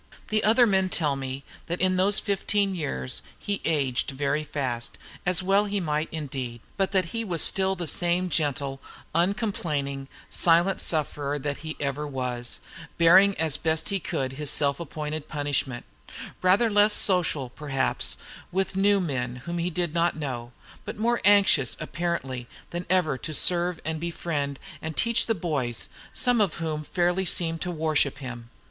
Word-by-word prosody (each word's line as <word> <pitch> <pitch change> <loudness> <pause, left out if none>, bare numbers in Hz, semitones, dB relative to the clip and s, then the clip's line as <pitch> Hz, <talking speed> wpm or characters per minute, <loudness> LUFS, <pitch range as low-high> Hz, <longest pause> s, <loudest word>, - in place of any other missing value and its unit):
The 215 0 +2
other 230 +3 +6
men 190 -3 +2
tell 150 -6 +1
me 135 0 -5 0.2
that 175 +1 -2
in 185 0 +2
those 195 +2 +4
fifteen 200 0 0
years 145 -6 -3 0.2
he 200 -1 -3
aged 140 -5 +1
very 140 +2 -1
fast, 130 -5 -3 0.3
as 180 0 +2
well 195 +2 +3
he 205 0 -1
might 155 -3 -1
indeed, 130 -6 -5 0.2
but 195 -1 0
that 190 -2 +3
he 230 0 -1
was 175 -7 +1
still 190 0 +2
the 175 - -4
same 175 +3 +2
gentle, 140 -4 -1 0.3
uncomplaining, 165 - -1 0.2
silent 175 +3 +3
sufferer 145 -2 -1
that 145 0 -3
he 155 0 -6
ever 145 +1 -2
was, 125 -3 -3 0.4
bearing 190 +4 +7
as 160 -3 +2
best 160 -1 0
he 195 - 0
could 130 -5 -3
his 145 +1 -2
self 140 -1 +2
appointed 155 -2 -5
punishment, 145 -4 -2 0.6
rather 190 +6 +4
less 205 +1 +5
social, 165 -9 +1
perhaps, 135 -2 -1 0.3
with 190 +1 -1
new 200 +1 +4
men 130 -8 -2
whom 175 0 -3
he 170 +1 0
did 175 -2 -2
not 170 0 +2
know, 125 -5 -4 0.3
but - - -6
more 235 +2 +1
anxious, 195 -10 +5
apparently, 135 -8 -3 0.2
than 175 +1 -4
ever 175 -8 +2
to 155 - -3
serve 175 0 +2
and 160 0 -2
befriend 155 -4 -2 0.2
and 160 -1 -5
teach 235 0 +2
the 225 - +2
boys, 145 - -2 0.2
some 245 -3 +2
of 195 -7 +1
whom 155 -2 -3
fairly 175 +4 +1
seemed 165 -2 0
to 180 - -2
worship 155 -4 +1
him. 125 -4 -7
160 Hz, 160 wpm, -26 LUFS, 140-185 Hz, 0.6 s, bearing